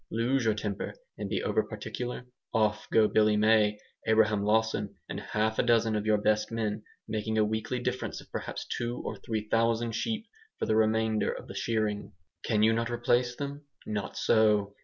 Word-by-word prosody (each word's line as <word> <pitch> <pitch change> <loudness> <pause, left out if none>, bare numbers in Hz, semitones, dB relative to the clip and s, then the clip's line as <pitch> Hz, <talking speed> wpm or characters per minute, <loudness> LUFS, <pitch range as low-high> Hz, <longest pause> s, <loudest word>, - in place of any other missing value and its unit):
Lose 120 +3 +1
your 110 -1 +3
temper, 100 -1 -4 0.2
and - - -3
be - - -1
over - - +2
particular: 125 0 -5 0.3
off 105 -1 +1
go 110 -1 +5
Billy 105 -1 +3
May, 105 -1 +4 0.3
Abraham 110 -2 +4
Lawson, 110 -1 +1
and - - -4
half 110 +1 -1
a - - +7
dozen 115 -2 +3
of 105 0 -2
your 110 -1 +4
best 105 +2 +1
men, 110 -2 -2 0.3
making 110 0 -2
a 110 - +4
weekly 110 +4 -2
difference 125 +1 -3
of - - -15
perhaps - - -4
two 120 0 -3
or - - -4
three 110 -2 -4
thousand 115 0 +2
sheep 220 - -2 0.3
for - - -1
the 110 - +1
remainder 110 0 +2
of - - -8
the - - -8
shearing. 110 -2 -1 0.3
Can 105 -2 +2
you 110 +1 +5
not 115 +1 0
replace 120 +1 +1
them? 145 +1 -6 0.2
Not 105 -1 -4
so! 105 -2 +3
110 Hz, 180 wpm, -29 LUFS, 105-115 Hz, 0.3 s, a